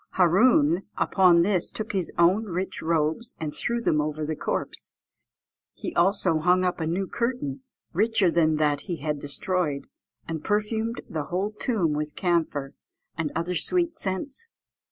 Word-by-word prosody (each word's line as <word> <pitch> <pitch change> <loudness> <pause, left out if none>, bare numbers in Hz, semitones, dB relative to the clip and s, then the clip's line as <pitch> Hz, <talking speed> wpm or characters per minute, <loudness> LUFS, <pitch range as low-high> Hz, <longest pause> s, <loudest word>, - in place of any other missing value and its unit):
Hâroon 180 - +4 0.2
upon 180 -3 +4
this 185 -2 +1
took 215 0 -5
his 190 -4 -1
own 180 +6 +4
rich 185 -1 -3
robes 160 +8 0
and 155 -2 -4
threw 235 0 -1
them 155 -10 +2
over 155 0 -3
the 155 +1 -2
corpse; - - -4 0.8
he - - -5
also 175 -2 +3
hung 180 +3 +3
up 180 -2 -1
a 160 - -1
new 180 +4 -1
curtain 235 - -2 0.3
richer 210 -1 +3
than 160 -2 +3
that 150 -2 +1
he 175 - 0
had 150 -1 -3
destroyed, 150 0 -2 0.4
and 160 -2 -4
perfumed 220 +2 -1
the 155 -3 -4
whole 185 +7 -2
tomb 210 -7 0
with 150 0 -3
camphor, 160 -6 0 0.4
and 165 -3 -2
other 170 +2 -1
sweet 340 - 0
scents. 270 - -4
175 Hz, 155 wpm, -26 LUFS, 155-205 Hz, 0.8 s, Hâroon